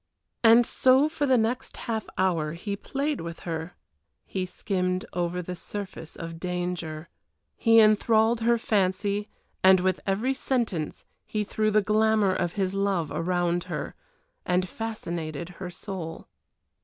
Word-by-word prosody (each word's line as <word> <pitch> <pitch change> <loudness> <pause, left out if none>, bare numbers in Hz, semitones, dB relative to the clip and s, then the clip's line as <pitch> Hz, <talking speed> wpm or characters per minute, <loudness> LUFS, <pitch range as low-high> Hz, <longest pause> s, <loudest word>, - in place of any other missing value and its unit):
And 230 +1 +7
so 260 +5 +4
for 305 -2 -1
the 260 -1 +5
next 230 +2 -1
half 225 -3 -2
hour 165 -5 +1
he 200 +4 -4
played 280 +7 -2
with 170 0 -7
her, 165 0 -5 0.5
he 185 -1 -3
skimmed 185 -1 -1
over 175 0 -1
the 180 +1 -5
surface 190 -3 -7
of 165 -1 -7
danger, 175 -3 -3 0.5
he 225 -1 +5
enthralled 220 +1 +4
her 235 +1 +3
fancy, 205 -1 0 0.3
and 190 0 +7
with 185 0 +1
every 215 +7 +1
sentence 235 - -2 0.2
he 210 -1 -1
threw 215 +1 0
the 215 0 +3
glamour 215 -2 +3
of 175 -2 -1
his 190 -2 -1
love 195 -6 0
around 175 +2 0
her, - - -4 0.5
and 180 +1 +1
fascinated 170 -7 -5
her 180 - -4
soul. 180 -3 -7
190 Hz, 140 wpm, -27 LUFS, 175-220 Hz, 0.5 s, And